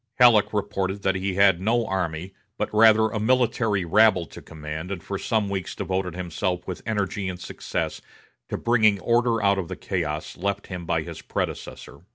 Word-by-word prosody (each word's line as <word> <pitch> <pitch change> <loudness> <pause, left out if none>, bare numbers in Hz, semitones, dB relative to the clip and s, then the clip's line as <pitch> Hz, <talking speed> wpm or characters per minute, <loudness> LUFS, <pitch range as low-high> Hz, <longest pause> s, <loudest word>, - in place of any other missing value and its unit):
Halleck 120 -4 +6
reported 100 -1 -2
that 95 - +2
he 95 0 -2
had 95 -2 +4
no 115 +3 +1
army, 90 -1 -3 0.2
but, - - -3
rather, 110 0 +6
a 110 - -3
military 115 -4 +1
rabble 105 -1 +4
to - - -12
command 80 +2 -7
and 95 -3 -5
for 100 -1 -4
some 110 -3 0
weeks 95 -3 -4
devoted 95 -2 -2
himself 90 0 -2
with 95 - -5
energy 100 -2 -1
and 90 -1 -6
success - - -4 0.5
to - - -2
bringing 110 -4 +3
order 115 +1 +1
out 100 -1 +3
of 90 - -3
the - - -5
chaos 80 -5 -3
left 100 +2 -2
him 90 -3 -7
by - - 0
his - - -8
predecessor. 70 - -5
100 Hz, 180 wpm, -25 LUFS, 90-110 Hz, 0.5 s, Halleck